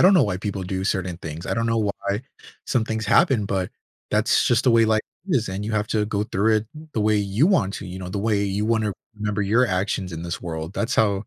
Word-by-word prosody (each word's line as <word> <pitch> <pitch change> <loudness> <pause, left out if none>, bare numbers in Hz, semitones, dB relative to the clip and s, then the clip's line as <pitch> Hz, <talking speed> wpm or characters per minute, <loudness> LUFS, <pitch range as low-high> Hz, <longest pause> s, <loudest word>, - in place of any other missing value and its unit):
don't 190 +2 +7
know 180 - +6
why 95 -4 -1
people 100 -1 -3
do 95 +1 -3
certain 95 -3 -1
things, 80 +2 -7
I - - -1
don't 115 0 0
know 115 0 +1 0.3
why 100 +4 0 0.4
some 120 -4 +1
things 110 -1 -3
happen, 135 - +4
but, 95 -2 -1 0.4
that's - - +3
just 120 +1 +2
the 125 - +5
way 115 -1 +6
life 110 0 +3 0.3
is, 125 - +1
and 95 +2 -4
you 110 - -3
have 105 -1 0
to 105 -1 +1
go 105 -1 -1
through 110 +2 +2
it 110 - -2 0.3
the 110 - +1
way 110 0 +3
you 105 - +2
want 125 - +2
to, 95 - -6
you 90 +1 -7
know, 90 -1 -6
the 100 - -3
way 105 -1 +1
you 100 +1 -1
wanna 110 -2 +1 0.2
remember 105 -1 -2
your 110 +6 +3
actions 95 -2 -1
in 80 - -5
this 85 - -4
world. 80 0 -5
That's 120 +3 -1
how 100 -2 +2
105 Hz, 250 wpm, -23 LUFS, 95-110 Hz, 0.4 s, don't